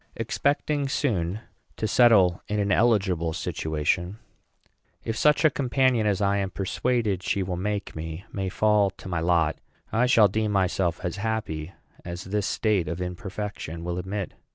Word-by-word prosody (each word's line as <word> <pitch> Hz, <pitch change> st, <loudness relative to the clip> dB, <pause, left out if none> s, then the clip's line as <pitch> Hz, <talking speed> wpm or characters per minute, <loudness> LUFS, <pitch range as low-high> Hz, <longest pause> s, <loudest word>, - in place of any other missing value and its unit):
Expecting 140 Hz, +4 st, 0 dB
soon 105 Hz, -, -1 dB, 0.4 s
to 110 Hz, -, -1 dB
settle 100 Hz, -6 st, +5 dB
in 105 Hz, -, -2 dB
an 100 Hz, 0 st, 0 dB
eligible 95 Hz, -9 st, +2 dB
situation, 80 Hz, +6 st, -1 dB, 0.9 s
if 115 Hz, -, -3 dB
such 150 Hz, +6 st, +3 dB
a 155 Hz, -, +6 dB
companion 130 Hz, -4 st, +2 dB
as 100 Hz, -1 st, +1 dB
I 100 Hz, 0 st, +2 dB
am 100 Hz, -1 st, -1 dB
persuaded 105 Hz, 0 st, -1 dB
she 95 Hz, +1 st, 0 dB
will 90 Hz, -1 st, -3 dB
make 100 Hz, +2 st, -3 dB
me 80 Hz, +4 st, -6 dB
may 95 Hz, -2 st, -2 dB
fall 105 Hz, 0 st, +3 dB
to 95 Hz, -, -12 dB
my 85 Hz, -2 st, -1 dB
lot, 85 Hz, -2 st, +2 dB, 0.4 s
I 120 Hz, +3 st, +3 dB
shall 115 Hz, -4 st, +6 dB
deem 110 Hz, +2 st, -1 dB
myself 90 Hz, -3 st, +1 dB
as 90 Hz, +2 st, -3 dB
happy 100 Hz, -6 st, -3 dB, 0.3 s
as 85 Hz, +1 st, -6 dB
this 105 Hz, +1 st, -1 dB
state 105 Hz, -7 st, +1 dB
of 85 Hz, +2 st, -4 dB
imperfection 90 Hz, -2 st, -5 dB
will 90 Hz, +1 st, -3 dB
admit. 95 Hz, +1 st, -4 dB
100 Hz, 155 wpm, -26 LUFS, 90-110 Hz, 0.9 s, a